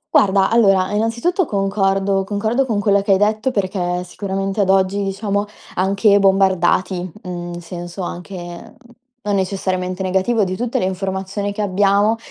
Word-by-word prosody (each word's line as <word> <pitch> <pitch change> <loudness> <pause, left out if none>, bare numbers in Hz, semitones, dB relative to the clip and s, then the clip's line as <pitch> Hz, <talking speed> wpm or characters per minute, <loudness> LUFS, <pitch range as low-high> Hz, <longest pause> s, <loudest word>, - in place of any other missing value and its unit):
Guarda, 195 0 +4
allora 195 -5 +3
innanzitutto 235 - 0
concordo 195 -1 0
concordo 220 +7 -1
con 220 -4 0
quella 200 -1 +3
che 200 0 +2
hai - - +4
detto, 215 +4 +1
perché 185 -5 -1
sicuramente 195 +2 -3
ad 190 - +1
oggi, 195 +1 +2
diciamo, 200 +1 -2 0.3
anche 200 +2 +3
bombardati, 190 -2 +2
mhmm, 175 -1 -6
in 175 - -7
senso 175 +2 -7
anche, 175 +1 -8 0.5
non 205 -1 +1
necessariamente 185 -1 -2
negativo, 190 +4 +1
di 185 -1 -2
tutte 240 0 -1
le - - -1
informazioni 190 +2 -3
che 210 - -4
abbiamo, 205 +2 +2
195 Hz, 145 wpm, -19 LUFS, 185-205 Hz, 0.5 s, Guarda